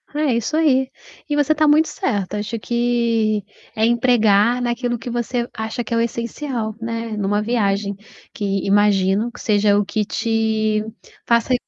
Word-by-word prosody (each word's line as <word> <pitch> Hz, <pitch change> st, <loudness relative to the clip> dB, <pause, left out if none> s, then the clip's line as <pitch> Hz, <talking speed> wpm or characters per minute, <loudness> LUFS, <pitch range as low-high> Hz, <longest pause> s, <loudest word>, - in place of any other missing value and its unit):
É 300 Hz, -3 st, +1 dB
isso 235 Hz, +7 st, -1 dB
aí. 265 Hz, -4 st, +3 dB, 0.4 s
E 295 Hz, -, 0 dB
você 290 Hz, 0 st, +2 dB
está 310 Hz, 0 st, +2 dB
muito 305 Hz, +2 st, +5 dB
certa, 210 Hz, -, -2 dB
acho 225 Hz, +2 st, -4 dB
que 235 Hz, -3 st, 0 dB, 0.3 s
é 220 Hz, -, +2 dB
empregar 235 Hz, -1 st, +3 dB
naquilo 240 Hz, 0 st, -1 dB
que 235 Hz, -, -7 dB
você 240 Hz, 0 st, -2 dB
acha 220 Hz, +2 st, -4 dB
que 235 Hz, -, -5 dB
é -, -, +2 dB
o -, -, +2 dB
essencial, 235 Hz, -1 st, -3 dB
né, 230 Hz, 0 st, -4 dB
numa 205 Hz, +1 st, 0 dB
viagem, 200 Hz, -3 st, 0 dB, 0.4 s
que 200 Hz, -2 st, -2 dB
imagino 200 Hz, +2 st, +2 dB
que -, -, -13 dB
seja 205 Hz, -1 st, +3 dB
o 205 Hz, -, +1 dB
que 210 Hz, +1 st, -1 dB
te 220 Hz, -1 st, 0 dB, 0.4 s
faça 235 Hz, +2 st, +2 dB
230 Hz, 160 wpm, -20 LUFS, 210-245 Hz, 0.4 s, muito